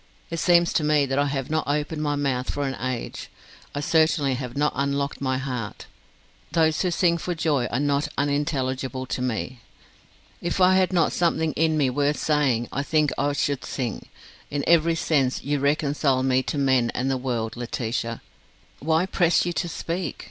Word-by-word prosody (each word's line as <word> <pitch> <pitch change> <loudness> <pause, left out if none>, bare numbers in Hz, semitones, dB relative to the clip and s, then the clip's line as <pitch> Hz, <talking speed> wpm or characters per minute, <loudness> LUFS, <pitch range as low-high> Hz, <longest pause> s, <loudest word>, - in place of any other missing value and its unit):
It 165 - -2
seems 175 0 +4
to 160 - +1
me 150 -1 +3
that 135 +1 -1
I 145 - +2
have 135 0 -3
not 155 0 0
opened 150 +2 -1
my 145 -1 0
mouth 135 -3 -1
for 145 - -2
an 135 - -2
age. 130 -2 -4 0.5
I 145 - -1
certainly 155 -2 +2
have 125 0 -5
not 150 +1 +2
unlocked 140 +1 -1
my 130 -1 0
heart. 125 -5 -5 0.7
Those 160 -2 +3
who 185 - +1
sing 170 0 +2
for 175 +1 -3
joy 150 -7 +1
are 120 - -2
not 145 +1 +1
unintelligible 135 -3 -1
to 125 - -3
me. 125 0 -3 0.8
If 175 +2 -2
I 185 0 +6
had 185 0 +3
not 170 -3 +2
something 165 -2 +1
in 160 0 +1
me 135 -4 +2
worth 145 +3 +1
saying 135 -6 +1
I 140 - 0
think 150 0 +1
I 145 +1 0
should 140 -1 -1
sing. 120 -5 -4 0.4
In 145 -1 -2
every 165 0 +4
sense 140 -6 +1
you 145 0 0
reconcile 140 -2 +1
me 130 0 +3
to - - -2
men 130 -4 +2
and 130 +2 0
the - - +1
world, 120 -4 -3
Laetitia. 115 -1 -3 0.6
Why 160 +3 +2
press 175 -3 +2
you 175 - -1
to 175 +1 -2
speak? 170 -1 -4
145 Hz, 185 wpm, -24 LUFS, 130-160 Hz, 0.8 s, I